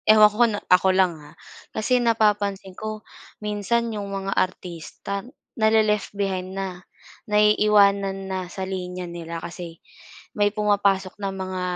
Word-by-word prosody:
Ewan 215 Hz, -1 st, +9 dB
ko -, -, -11 dB
kung 230 Hz, -3 st, +4 dB, 0.2 s
ako 180 Hz, +1 st, +5 dB
lang 185 Hz, -2 st, +4 dB
ha, 150 Hz, 0 st, -14 dB, 0.5 s
kasi 245 Hz, +3 st, +2 dB
napapansin 205 Hz, -4 st, +1 dB
ko 215 Hz, +2 st, -6 dB, 0.3 s
minsan 215 Hz, +2 st, -1 dB
yung 205 Hz, -2 st, -4 dB
mga 195 Hz, 0 st, -3 dB
artista, 185 Hz, +2 st, -3 dB, 0.4 s
nale-left 220 Hz, -2 st, +3 dB
behind 190 Hz, -1 st, -2 dB
na, 185 Hz, -2 st, -4 dB, 0.5 s
naiiwanan 205 Hz, -2 st, +4 dB
na 185 Hz, -2 st, -4 dB
sa 190 Hz, +1 st, -5 dB
linya 180 Hz, -1 st, -5 dB
nila, 170 Hz, -1 st, -6 dB
kasi 170 Hz, 0 st, -8 dB, 0.6 s
may 205 Hz, 0 st, +2 dB
pumapasok 200 Hz, -2 st, +1 dB
ng 195 Hz, -1 st, -3 dB
mga 185 Hz, -1 st, -4 dB
195 Hz, 135 wpm, -24 LUFS, 185-210 Hz, 0.6 s, Ewan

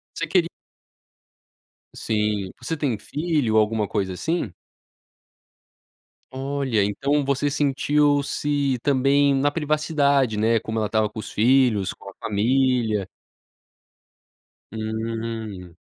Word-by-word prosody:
Você 165 Hz, -, -2 dB
queri 170 Hz, 0 st, +2 dB, 1.5 s
Sim, 105 Hz, -3 st, -1 dB
você 165 Hz, -, -3 dB
tem 140 Hz, -8 st, -1 dB
filho, 145 Hz, -3 st, 0 dB
alguma 110 Hz, 0 st, +1 dB
coisa 95 Hz, -2 st, -2 dB
assim? 160 Hz, -, -2 dB, 1.8 s
Olha. 135 Hz, -4 st, -1 dB
Então 140 Hz, +9 st, 0 dB
você 140 Hz, +1 st, +1 dB
sentiu 145 Hz, +1 st, +2 dB
se 140 Hz, -2 st, -1 dB
também 140 Hz, +1 st, +3 dB
na 140 Hz, +2 st, +2 dB
privacidade, 145 Hz, -6 st, +1 dB
né, 115 Hz, +2 st, +3 dB
como 110 Hz, 0 st, -4 dB
ela 110 Hz, -, 0 dB
estava 110 Hz, 0 st, +1 dB
com 110 Hz, -, -10 dB
os -, -, -8 dB
filhos, 115 Hz, -4 st, +3 dB
com -, -, -13 dB
a 95 Hz, -, -11 dB
família. 115 Hz, -1 st, +1 dB, 1.7 s
Hum. 110 Hz, -4 st, -5 dB
125 Hz, 105 wpm, -23 LUFS, 110-145 Hz, 1.8 s, também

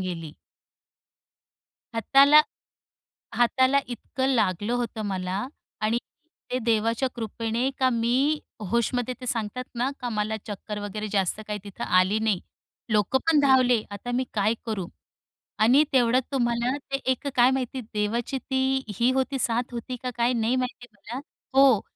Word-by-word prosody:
गेली. 165 Hz, -4 st, -5 dB, 1.6 s
हाताला 280 Hz, +6 st, +6 dB, 1.0 s
हाताला 260 Hz, +3 st, +4 dB
इतकं 260 Hz, +2 st, -3 dB
लागलं 205 Hz, 0 st, +1 dB
होतं 235 Hz, -2 st, -2 dB
मला. 190 Hz, +2 st, -2 dB, 0.3 s
आणि 215 Hz, +2 st, +1 dB, 0.5 s
ते 255 Hz, -, +1 dB
देवाच्या 230 Hz, +3 st, +1 dB
कृपेने 230 Hz, +2 st, -2 dB
का 260 Hz, -1 st, +3 dB
मी 250 Hz, +6 st, +2 dB, 0.3 s
होशमध्ये 245 Hz, +2 st, 0 dB
ते 250 Hz, -, -7 dB
सांगतात 230 Hz, +1 st, -2 dB
ना, 245 Hz, +3 st, 0 dB
का 250 Hz, -, -3 dB
मला 215 Hz, -1 st, -1 dB
चक्कर 210 Hz, 0 st, -6 dB
वगैरे 210 Hz, +1 st, -4 dB
जास्त 195 Hz, +1 st, 0 dB
काही 210 Hz, 0 st, -2 dB
तिथं 200 Hz, -2 st, -6 dB
आली 185 Hz, +3 st, +3 dB
नाही. 215 Hz, -4 st, +1 dB, 0.5 s
लोकंपण 265 Hz, +9 st, +3 dB
धावले. 255 Hz, -4 st, +4 dB
आता 205 Hz, +4 st, -6 dB
मी 255 Hz, +1 st, +1 dB
काय 215 Hz, +1 st, +2 dB
करू? 210 Hz, -6 st, -2 dB, 0.7 s
आणि 250 Hz, +8 st, +5 dB
तेवढ्यात 250 Hz, 0 st, +4 dB
तुम्हाला 240 Hz, 0 st, +1 dB, 0.2 s
ते -, -, +3 dB, 0.2 s
एक 260 Hz, -, -7 dB
काय 245 Hz, +1 st, +6 dB
माहिती 260 Hz, 0 st, -2 dB
देवाची 230 Hz, +6 st, -1 dB
ती 265 Hz, 0 st, 0 dB, 0.2 s
ही 240 Hz, +2 st, +4 dB
होती 265 Hz, +1 st, 0 dB
साथ 240 Hz, +1 st, 0 dB
होती 240 Hz, +2 st, -5 dB
का 250 Hz, -, -1 dB
काय 240 Hz, +1 st, +2 dB
नाही 235 Hz, +1 st, +1 dB
माहिती 250 Hz, -1 st, -3 dB
मला. 215 Hz, +5 st, -7 dB, 0.3 s
हो. 270 Hz, -5 st, +6 dB
235 Hz, 140 wpm, -26 LUFS, 215-260 Hz, 1.6 s, हाताला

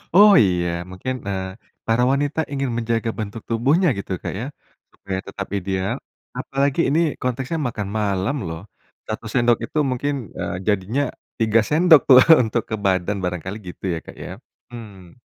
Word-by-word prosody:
Oh 205 Hz, +2 st, +9 dB
iya, 90 Hz, -3 st, +1 dB, 0.2 s
mungkin, 95 Hz, +8 st, -4 dB
eee, 95 Hz, -1 st, -2 dB, 0.4 s
para 115 Hz, +2 st, +3 dB
wanita 145 Hz, +3 st, 0 dB
ingin 135 Hz, -1 st, -1 dB
menjaga 115 Hz, -1 st, -1 dB
bentuk 110 Hz, +1 st, -5 dB
tubuhnya 135 Hz, +11 st, +2 dB
gitu 100 Hz, -, -6 dB
Kak -, -, -3 dB
ya. 120 Hz, -, -3 dB, 0.5 s
Supaya 95 Hz, -1 st, -5 dB
tetap 100 Hz, 0 st, -6 dB
ideal 95 Hz, 0 st, -2 dB, 0.4 s
apalagi 140 Hz, +3 st, 0 dB
ini 150 Hz, +4 st, +2 dB, 0.2 s
konteksnya 130 Hz, +5 st, -2 dB
makan 105 Hz, -4 st, -4 dB
malam 100 Hz, +3 st, 0 dB
loh, 80 Hz, 0 st, -6 dB, 0.5 s
1 110 Hz, +1 st, -4 dB
sendok 120 Hz, -2 st, +3 dB
itu 155 Hz, -, -7 dB
mungkin, 135 Hz, +3 st, -1 dB, 0.3 s
eee, -, -, -3 dB
jadinya 105 Hz, +7 st, +1 dB, 0.4 s
3 110 Hz, 0 st, +4 dB
sendok 160 Hz, -1 st, +6 dB
tuh, 130 Hz, -1 st, +10 dB, 0.3 s
untuk 115 Hz, +1 st, 0 dB
ke 110 Hz, -, -1 dB
badan 95 Hz, +1 st, +1 dB
barangkali 90 Hz, +2 st, -3 dB, 0.2 s
gitu -, -, -40 dB
ya 80 Hz, -, -3 dB
Kak -, -, -11 dB
ya, -, -, -7 dB, 0.4 s
mmm. 105 Hz, -6 st, -11 dB
115 Hz, 155 wpm, -22 LUFS, 95-135 Hz, 0.5 s, tuh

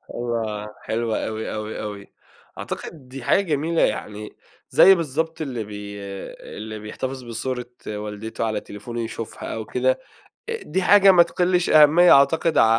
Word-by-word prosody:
أيوة، 110 Hz, -3 st, -3 dB
حلو 115 Hz, 0 st, -1 dB
أوي، 110 Hz, 0 st, -3 dB
أوي، 110 Hz, 0 st, -5 dB
أوي، 105 Hz, -1 st, -7 dB, 0.5 s
أعتقد 145 Hz, -6 st, -7 dB
دي 130 Hz, -1 st, -8 dB
حاجة -, -, +3 dB
جميلة 165 Hz, -2 st, 0 dB
يعني، 105 Hz, 0 st, -2 dB, 0.3 s
زي 195 Hz, 0 st, +7 dB
بالضبط 160 Hz, 0 st, -2 dB
اللي 130 Hz, -7 st, -3 dB
بي 105 Hz, -1 st, -8 dB, 0.6 s
اللي 110 Hz, 0 st, -6 dB
بيحتفظ 130 Hz, +5 st, -5 dB
بصورة 120 Hz, +1 st, -4 dB, 0.2 s
والدته 105 Hz, +2 st, -5 dB
على 110 Hz, -1 st, -1 dB
تليفونه 115 Hz, +4 st, -7 dB
يشوفها 115 Hz, 0 st, -6 dB
أو 110 Hz, -1 st, -5 dB
كده. 130 Hz, +1 st, 0 dB, 0.5 s
آآ 460 Hz, 0 st, -4 dB
دي 190 Hz, -, -2 dB
حاجة 200 Hz, +1 st, +7 dB
ما 175 Hz, -, +7 dB
تقلش 180 Hz, +1 st, +1 dB
أهمية 155 Hz, +4 st, +7 dB
أعتقد 155 Hz, +4 st, +4 dB
ع -, -, +7 dB
120 Hz, 145 wpm, -23 LUFS, 110-160 Hz, 0.6 s, زي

